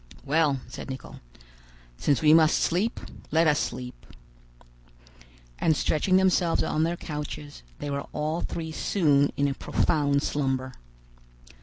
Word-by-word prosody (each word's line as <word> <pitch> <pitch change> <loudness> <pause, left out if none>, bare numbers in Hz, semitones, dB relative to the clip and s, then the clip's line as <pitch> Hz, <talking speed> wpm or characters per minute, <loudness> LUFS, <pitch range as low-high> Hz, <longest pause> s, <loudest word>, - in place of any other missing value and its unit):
"Well," 145 -2 +2
said 125 - -8
Nicholl, 130 0 -8 0.8
"since 140 - 0
we 155 0 +7
must 160 -1 +5
sleep, 190 +7 0 0.3
let 160 +2 +3
us 150 -2 +3
sleep." 125 0 -5 1.5
And 160 -3 +2
stretching 185 +5 +2
themselves 185 -3 +2
on 155 - 0
their 170 +2 0
couches, 150 -2 -7 0.2
they 145 - -5
were 140 0 -3
all 155 +3 -2
three 160 -1 -4
soon 145 -5 +2
in 140 - +2
a 140 - -1
profound 145 0 +1
slumber. 130 -2 -1
150 Hz, 130 wpm, -26 LUFS, 140-165 Hz, 1.5 s, we